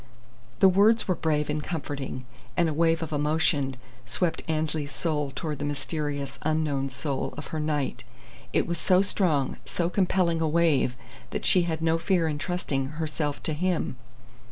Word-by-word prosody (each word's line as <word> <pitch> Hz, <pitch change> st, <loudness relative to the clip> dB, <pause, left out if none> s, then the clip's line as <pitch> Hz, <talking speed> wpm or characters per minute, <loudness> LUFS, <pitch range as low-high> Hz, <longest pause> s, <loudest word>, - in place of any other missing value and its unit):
The 195 Hz, -, +9 dB
words 205 Hz, +5 st, +4 dB
were 185 Hz, -, +3 dB
brave 150 Hz, -3 st, 0 dB
and 150 Hz, 0 st, -2 dB
comforting, 140 Hz, -5 st, -4 dB, 0.3 s
and 170 Hz, -, +4 dB
a 155 Hz, -, 0 dB
wave 165 Hz, +1 st, +2 dB
of 155 Hz, -, -5 dB
emotion 150 Hz, -2 st, +1 dB, 0.3 s
swept 170 Hz, -3 st, 0 dB
Annesley's 155 Hz, -2 st, -1 dB
soul 150 Hz, -1 st, -1 dB
toward 150 Hz, +1 st, -4 dB
the -, -, -3 dB
mysterious, 145 Hz, 0 st, -3 dB
unknown 150 Hz, -3 st, 0 dB
soul 135 Hz, +1 st, -3 dB
of 145 Hz, -, -7 dB
her 160 Hz, -, -1 dB
knight. 150 Hz, -2 st, -1 dB, 0.5 s
It -, -, +2 dB
was 170 Hz, -1 st, -3 dB
so 185 Hz, +3 st, +4 dB
strong, 160 Hz, -9 st, +1 dB
so 170 Hz, 0 st, -1 dB
compelling 180 Hz, -4 st, +2 dB
a 160 Hz, -, +2 dB
wave 155 Hz, -6 st, +3 dB, 0.3 s
that -, -, -4 dB
she 180 Hz, -, +5 dB
had 160 Hz, 0 st, -2 dB
no 165 Hz, 0 st, +3 dB
fear 170 Hz, -1 st, +2 dB
in 150 Hz, -2 st, -2 dB
trusting, 155 Hz, -6 st, -1 dB
herself 155 Hz, -2 st, -2 dB
to 160 Hz, -, -1 dB
him. 175 Hz, -3 st, 0 dB
155 Hz, 165 wpm, -27 LUFS, 145-170 Hz, 0.5 s, The